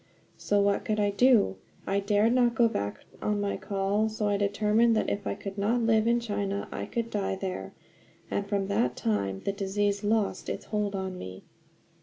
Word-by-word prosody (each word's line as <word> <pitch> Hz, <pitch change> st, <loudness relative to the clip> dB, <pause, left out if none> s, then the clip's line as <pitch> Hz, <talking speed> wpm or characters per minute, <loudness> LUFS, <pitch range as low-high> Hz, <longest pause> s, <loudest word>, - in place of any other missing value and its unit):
So 205 Hz, -, +1 dB
what 200 Hz, 0 st, +2 dB
could 215 Hz, -1 st, -1 dB
I 205 Hz, -1 st, +2 dB
do? 210 Hz, -, +4 dB, 0.3 s
I 195 Hz, +1 st, +1 dB
dared 205 Hz, +3 st, +2 dB
not 240 Hz, -2 st, +3 dB
go 235 Hz, 0 st, +5 dB
back 100 Hz, -, -3 dB, 0.2 s
on 210 Hz, -1 st, 0 dB
my 200 Hz, 0 st, -1 dB
call; 200 Hz, +2 st, 0 dB
so 215 Hz, -1 st, -2 dB
I 205 Hz, -, +2 dB
determined 210 Hz, +3 st, +2 dB
that 215 Hz, -, +1 dB
if 200 Hz, -1 st, -3 dB
I -, -, -1 dB
could 195 Hz, 0 st, -7 dB
not 230 Hz, +4 st, +1 dB
live 225 Hz, -1 st, +3 dB
in 235 Hz, +1 st, +3 dB
China 200 Hz, -3 st, -2 dB
I -, -, -4 dB
could 230 Hz, -1 st, -3 dB
die 200 Hz, -2 st, -1 dB
there; 185 Hz, -, -5 dB, 0.6 s
and 200 Hz, -, -1 dB
from 200 Hz, -2 st, 0 dB
that 125 Hz, -11 st, 0 dB
time 100 Hz, -3 st, -1 dB
the -, -, -1 dB
disease 200 Hz, +1 st, -1 dB
lost 210 Hz, -1 st, 0 dB
its -, -, -4 dB
hold 210 Hz, -2 st, -1 dB
on 190 Hz, -1 st, -4 dB
me." 95 Hz, 0 st, -8 dB
205 Hz, 195 wpm, -28 LUFS, 195-220 Hz, 0.6 s, go